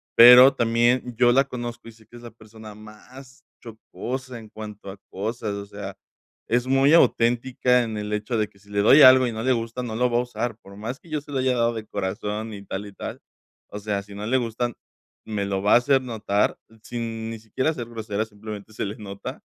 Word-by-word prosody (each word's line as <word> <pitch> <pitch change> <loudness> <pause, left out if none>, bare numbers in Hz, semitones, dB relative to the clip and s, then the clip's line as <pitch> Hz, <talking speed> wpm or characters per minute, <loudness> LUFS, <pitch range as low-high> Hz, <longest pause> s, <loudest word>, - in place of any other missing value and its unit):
pero 125 +3 +10
también 120 +2 +1
yo 120 0 +5
la 135 +3 +4
conozco 120 -3 -7
y - - -9
sé 110 -1 -22
que - - -17
es 120 - -14
la 120 - -9
persona 110 -1 -13
más 125 +5 -15 0.2
fastidiosa 125 +2 -7
en 110 -1 -13
cuanto 105 -2 -9
a 95 - -9
cosas, 110 +2 -4
o 100 0 -6
sea, 100 -1 -8 0.5
es 120 +2 +1
muy 135 +3 +4
auténtica 125 -3 +3
en 110 -2 -5
el 105 0 -5
hecho 105 +3 -2
de 110 -1 0
que - - -26
si 100 +1 -23
le 100 - -1
doy 135 +8 +7
algo 130 0 +8
y - - -2
no 110 0 -5
le 130 - +2
gusta, 115 +1 -4
no 115 -3 -5
lo 125 +2 +1
va 120 - +1
a - - +3
usar, 120 -2 -4
por 100 0 -14
más 115 +6 -6
que 170 - -22
yo 155 -1 -2
se 145 - -14
lo 140 - -2
haya 130 -1 +1
dado 120 0 +1
de 110 -1 -6
corazón, 105 +3 -4
y 100 -1 -9
tal, 100 +2 -5
y 100 - -12
tal, - - -7 0.5
o 105 - -7
sea, 100 -1 -2
si 100 0 -13
no 105 +1 -6
le 130 +4 +2
gustan, 120 0 -2 0.5
me 105 -2 -3
lo 95 -1 -2
va 105 - +3
a - - +9
hacer 135 +2 +2
notar 110 -4 -1 0.3
sin 115 -2 -5
ni 115 - -6
siquiera 115 +7 -1
ser 120 -6 -6
grosera 110 -2 -4
simplemente 105 0 -10
se - - -3
le 105 +2 -5
nota 100 -3 -8
115 Hz, 230 wpm, -24 LUFS, 105-125 Hz, 0.5 s, pero